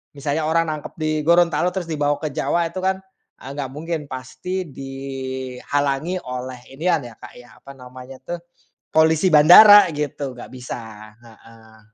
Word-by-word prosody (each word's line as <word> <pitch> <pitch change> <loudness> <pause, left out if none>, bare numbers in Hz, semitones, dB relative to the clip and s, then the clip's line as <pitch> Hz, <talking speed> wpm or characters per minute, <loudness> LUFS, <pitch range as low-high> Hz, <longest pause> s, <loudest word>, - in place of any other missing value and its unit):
misalnya 145 +2 -2
orang 165 0 +1
nangkep 150 -1 -7
di 155 0 -1
Gorontalo, 170 +1 +3
terus 175 -3 -4
dibawa 145 -1 0
ke 155 - -2
Jawa, 165 +2 0
itu 185 - -5
kan, 190 0 0 0.4
eee, 135 - -8
nggak 140 -3 -5
mungkin. 160 +2 -4
Pasti 130 +9 -5
dihalangi 135 +3 -4
oleh 125 0 -6
inian, 165 +3 0
ya 120 -2 -11
Kak, - - -12
ya, 120 -1 -16
apa 140 - -13
namanya 130 0 -12
tuh, 175 +5 -5 0.5
polisi 160 +2 +3
bandara, 195 +7 +9
gitu. 145 -2 -4
Nggak 120 - -10
bisa, 125 -1 -7 0.4
heeh. 110 -1 -18
145 Hz, 150 wpm, -21 LUFS, 130-165 Hz, 0.5 s, bandara